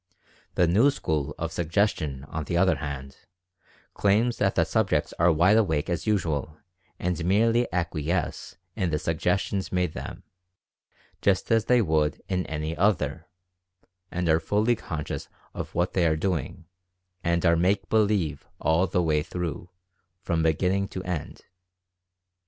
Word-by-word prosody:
The 90 Hz, -, +4 dB
new 110 Hz, +12 st, +5 dB
school 80 Hz, -, -2 dB
of 85 Hz, 0 st, -3 dB
"Suggestion/' 80 Hz, -5 st, -1 dB
on 80 Hz, -1 st, -4 dB
the 85 Hz, -, -1 dB
other 95 Hz, +1 st, +3 dB
hand, 70 Hz, -2 st, -6 dB, 0.8 s
claims 110 Hz, +4 st, +2 dB
that 95 Hz, -1 st, +1 dB
the 85 Hz, -, +4 dB
sub 105 Hz, +3 st, +1 dB
jects 75 Hz, -, 0 dB
are 85 Hz, +1 st, +5 dB
wide 90 Hz, +7 st, +4 dB
awake 80 Hz, -7 st, +1 dB
as 85 Hz, -, -2 dB
usual 80 Hz, -7 st, -1 dB, 0.4 s
and 90 Hz, -1 st, -2 dB
merely 115 Hz, +6 st, +2 dB
acquiesce 85 Hz, -1 st, -2 dB, 0.2 s
in 95 Hz, -5 st, 0 dB
the 75 Hz, -, 0 dB
suggestions 90 Hz, +5 st, -1 dB
made 90 Hz, -3 st, 0 dB
them, -, -, -7 dB, 1.0 s
just 100 Hz, +3 st, +1 dB
as 115 Hz, -1 st, +3 dB
they 125 Hz, -2 st, +4 dB
would 80 Hz, -3 st, +1 dB
in 90 Hz, -1 st, -1 dB
any 80 Hz, +1 st, -3 dB
other, 100 Hz, +4 st, 0 dB, 0.8 s
and 90 Hz, 0 st, -2 dB
are 80 Hz, 0 st, +4 dB
fully 105 Hz, +8 st, +1 dB
conscious 80 Hz, -9 st, -5 dB, 0.3 s
of -, -, -6 dB
what 90 Hz, +1 st, 0 dB
they 90 Hz, -3 st, +3 dB
are 80 Hz, -1 st, +1 dB
doing, 85 Hz, -1 st, -2 dB, 0.6 s
and 85 Hz, 0 st, +1 dB
are 85 Hz, 0 st, +5 dB
"make 95 Hz, +3 st, +1 dB
believe" 105 Hz, -7 st, +1 dB
all 80 Hz, +4 st, +2 dB
the 90 Hz, 0 st, +1 dB
way 75 Hz, -2 st, +2 dB
through, 85 Hz, 0 st, -5 dB, 0.5 s
from 85 Hz, -1 st, 0 dB
beginning 90 Hz, +5 st, +1 dB
to 95 Hz, -, -6 dB
end. 90 Hz, -5 st, -5 dB
90 Hz, 145 wpm, -26 LUFS, 80-100 Hz, 1.0 s, new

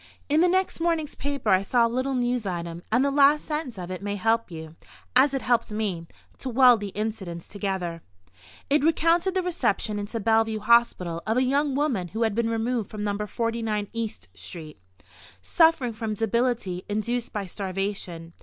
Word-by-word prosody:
In 300 Hz, +3 st, +4 dB
the 355 Hz, -, +5 dB
next 375 Hz, 0 st, +1 dB
morning's 330 Hz, -3 st, 0 dB
paper 280 Hz, -6 st, -3 dB
I 190 Hz, 0 st, +5 dB
saw 235 Hz, +4 st, +3 dB
a -, -, +3 dB
little 255 Hz, +3 st, -1 dB
news 245 Hz, -3 st, 0 dB
item, 170 Hz, -2 st, -4 dB
and 245 Hz, +5 st, +3 dB
the 280 Hz, -, +1 dB
last 285 Hz, +1 st, +4 dB
sentence 300 Hz, -7 st, -4 dB
of 180 Hz, 0 st, -6 dB
it 185 Hz, -, -5 dB
may 205 Hz, 0 st, -3 dB
help 225 Hz, +2 st, +1 dB
you 160 Hz, -1 st, -9 dB, 0.4 s
(as 265 Hz, +3 st, +6 dB
it 270 Hz, -, -2 dB
helped 235 Hz, -3 st, +1 dB
me) 200 Hz, -6 st, -2 dB, 0.3 s
to 265 Hz, -, -4 dB
weld 250 Hz, -1 st, +6 dB
the 205 Hz, -, -4 dB
incidents 205 Hz, -6 st, -4 dB
together. 190 Hz, -5 st, -3 dB, 0.7 s
It 285 Hz, 0 st, +2 dB
recounted 335 Hz, +4 st, +2 dB
the 375 Hz, -, +1 dB
reception 235 Hz, -, -1 dB
into 205 Hz, +3 st, -4 dB
Bellevue 225 Hz, 0 st, +2 dB
Hospital 210 Hz, -7 st, +2 dB
of 220 Hz, +2 st, +1 dB
a 255 Hz, -, +4 dB
young 280 Hz, +1 st, +1 dB
woman 265 Hz, -11 st, 0 dB
who 220 Hz, +6 st, -2 dB
had 220 Hz, -2 st, +1 dB
been 230 Hz, +1 st, 0 dB
removed 230 Hz, -1 st, -1 dB
from 210 Hz, -1 st, -5 dB
No. 205 Hz, -1 st, -1 dB
49 225 Hz, -3 st, -2 dB
East 225 Hz, -, -4 dB
–––– -, -, -39 dB
street, 105 Hz, -, -9 dB, 0.6 s
suffering 320 Hz, -8 st, +3 dB
from 220 Hz, -1 st, -3 dB
debility 225 Hz, -4 st, 0 dB
induced 230 Hz, +3 st, -2 dB
by 205 Hz, -2 st, -3 dB
starvation. 185 Hz, -3 st, -4 dB
225 Hz, 180 wpm, -25 LUFS, 195-255 Hz, 0.7 s, as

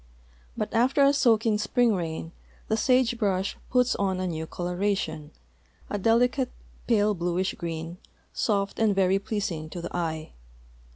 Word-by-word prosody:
But -, -, -3 dB
after 255 Hz, +5 st, +3 dB
a 275 Hz, +1 st, +5 dB
soaking 225 Hz, -5 st, +3 dB
spring 235 Hz, +2 st, +2 dB
rain 165 Hz, -3 st, -4 dB, 0.4 s
the 220 Hz, -, +2 dB
sage 250 Hz, +1 st, +2 dB
brush 195 Hz, -3 st, 0 dB
puts 250 Hz, 0 st, +3 dB
on 190 Hz, -2 st, 0 dB
a 185 Hz, -, -1 dB
new 160 Hz, -2 st, -3 dB
coloration, 180 Hz, -3 st, -2 dB, 0.6 s
a 205 Hz, -, -1 dB
delicate 245 Hz, +5 st, +2 dB, 0.4 s
pale 210 Hz, -3 st, +3 dB
bluish 180 Hz, +1 st, -1 dB
green, 165 Hz, 0 st, -5 dB, 0.3 s
soft 200 Hz, -2 st, 0 dB
and 215 Hz, -3 st, +3 dB
veiy 190 Hz, 0 st, +3 dB
))leasing 195 Hz, -8 st, -3 dB
to 175 Hz, -, -6 dB
the 170 Hz, -, -6 dB
eye. 160 Hz, -2 st, -3 dB
200 Hz, 140 wpm, -26 LUFS, 175-230 Hz, 0.6 s, a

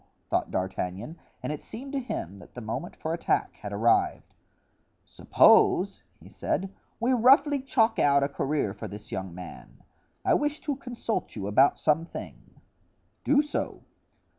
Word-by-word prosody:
thought -, -, +1 dB
D'Artagnan, 95 Hz, -, -4 dB, 0.2 s
and -, -, -2 dB
it 150 Hz, -, -7 dB
seemed 270 Hz, +5 st, -9 dB
to 280 Hz, -, 0 dB
him 100 Hz, -, -5 dB
that -, -, -16 dB
the -, -, -5 dB
moment 130 Hz, +10 st, -5 dB
for 160 Hz, -, -3 dB
attack 170 Hz, -, 0 dB
had 105 Hz, -, -7 dB
arrived. 110 Hz, +3 st, +1 dB, 0.7 s
"Suppose," -, -, +4 dB, 0.2 s
he -, -, -15 dB
said, 195 Hz, +1 st, -3 dB, 0.3 s
"we 245 Hz, +3 st, +2 dB
roughly 270 Hz, +4 st, +5 dB
chalk 230 Hz, -4 st, +2 dB
out 140 Hz, -1 st, +4 dB
a -, -, +2 dB
career 140 Hz, -6 st, -1 dB
for 100 Hz, -, -7 dB
this 105 Hz, +1 st, -10 dB
young 95 Hz, -2 st, -5 dB
man. 90 Hz, -1 st, -11 dB, 0.4 s
I -, -, +4 dB
wish 295 Hz, +1 st, 0 dB
to 290 Hz, -3 st, -2 dB
consult 240 Hz, -4 st, -4 dB
you 100 Hz, -3 st, -4 dB
about 130 Hz, +8 st, +4 dB
some 160 Hz, +2 st, +2 dB
thing." -, -, -10 dB, 0.7 s
"Do 290 Hz, 0 st, +4 dB
so." 295 Hz, -, -4 dB
155 Hz, 155 wpm, -27 LUFS, -, 0.7 s, roughly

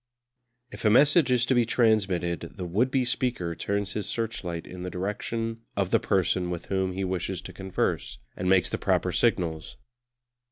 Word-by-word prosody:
If -, -, -9 dB
a 110 Hz, -, +5 dB
message 145 Hz, +5 st, +5 dB
is 125 Hz, -1 st, +3 dB
to 130 Hz, -, +2 dB
be 120 Hz, -1 st, +4 dB
transmitted 100 Hz, -7 st, +1 dB
the 90 Hz, -, -5 dB
would 105 Hz, +9 st, +1 dB
be 130 Hz, -1 st, +1 dB
speaker 120 Hz, -8 st, -1 dB
turns 100 Hz, +3 st, -2 dB
his 105 Hz, -2 st, -3 dB
searchlight 90 Hz, -7 st, -3 dB
in 90 Hz, 0 st, -9 dB
the 90 Hz, -, -4 dB
direction 115 Hz, +5 st, -3 dB, 0.2 s
of 95 Hz, -2 st, 0 dB
the -, -, +4 dB
person 90 Hz, -1 st, +1 dB
with 85 Hz, -1 st, -4 dB
whom 95 Hz, -1 st, 0 dB
he 95 Hz, +1 st, -2 dB
wishes 95 Hz, 0 st, -2 dB
to -, -, -9 dB
converse, 95 Hz, -9 st, -2 dB, 0.2 s
and 90 Hz, +1 st, -2 dB
makes 95 Hz, -2 st, +4 dB
the -, -, -2 dB
proper -, -, +1 dB
signals. 80 Hz, -3 st, 0 dB
95 Hz, 175 wpm, -27 LUFS, 90-115 Hz, 0.2 s, a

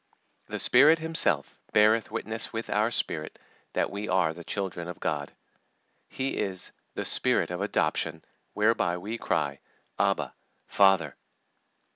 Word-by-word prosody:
"The -, -, -4 dB
Spirit 145 Hz, +6 st, +6 dB
Himself 160 Hz, 0 st, +1 dB
beareth 110 Hz, +1 st, +4 dB
witness 110 Hz, 0 st, -2 dB
with 115 Hz, 0 st, -5 dB
our 105 Hz, +2 st, +2 dB
spirit 80 Hz, -9 st, -2 dB, 0.4 s
that -, -, 0 dB
we 100 Hz, +1 st, -5 dB
are 90 Hz, -3 st, +2 dB
the 85 Hz, +1 st, -10 dB
children 95 Hz, -3 st, -4 dB
of 90 Hz, -, -7 dB
God." 75 Hz, -2 st, -2 dB, 0.8 s
He 135 Hz, +1 st, -3 dB
is 95 Hz, -2 st, -2 dB, 0.2 s
"the -, -, -3 dB
Spirit -, -, +2 dB
of 90 Hz, +2 st, -4 dB
adoption, 80 Hz, -4 st, -1 dB, 0.3 s
whereby 105 Hz, -5 st, +2 dB
we 105 Hz, +6 st, -5 dB
cry, -, -, -1 dB, 0.4 s
Abba, -, -, +1 dB, 0.3 s
Father." 95 Hz, -3 st, +3 dB
100 Hz, 130 wpm, -27 LUFS, 85-115 Hz, 0.8 s, Spirit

